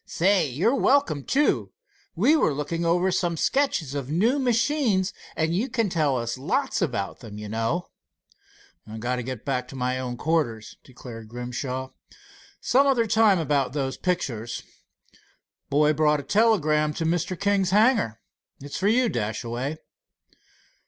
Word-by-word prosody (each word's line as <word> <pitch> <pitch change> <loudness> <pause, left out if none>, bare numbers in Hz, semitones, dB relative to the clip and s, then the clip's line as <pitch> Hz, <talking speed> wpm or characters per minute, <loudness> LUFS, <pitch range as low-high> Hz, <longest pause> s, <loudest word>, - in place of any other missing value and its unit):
"Say, 185 -3 +2
you're 170 - +1
welcome, 275 - +2
too. 290 - +1 0.4
We 240 - +4
were 155 - +2
looking 155 +4 -3
over 175 +3 +2
some 175 -2 0
sketches 220 - 0
of 140 -2 -4
new 220 - +2
machines, 230 -5 +1 0.2
and 160 +1 0
you 235 +8 -1
can 230 -5 0
tell 150 -6 +1
us 120 +1 -3
lots 260 - -1
about 120 - -2
them, 105 -3 -10
you 105 0 -7
know." 115 +11 -2 1.1
"Got 125 +3 -2
to - - -2
get 125 -2 -6
back 125 -2 -1
to 135 - -11
my 125 0 -1
own 125 -1 -4
quarters," 125 -8 -1
declared 120 -3 -11
Grimshaw. 125 +2 -5 0.7
"Some 275 +3 +3
other 250 -4 +3
time 220 -2 +4
about 145 -5 0
those 135 -2 -2
pictures. 120 - -3 1.1
Boy 150 +2 +3
brought 150 -1 +2
a - - -6
telegram 155 -5 +2
to 165 - -2
Mr. 175 +2 -1
King's 200 -2 +1
hangar. 205 - +2 0.4
It's 140 +1 -6
for 195 - +1
you, 245 +3 +3
Dashaway." 120 - -3
155 Hz, 145 wpm, -25 LUFS, 125-200 Hz, 1.1 s, We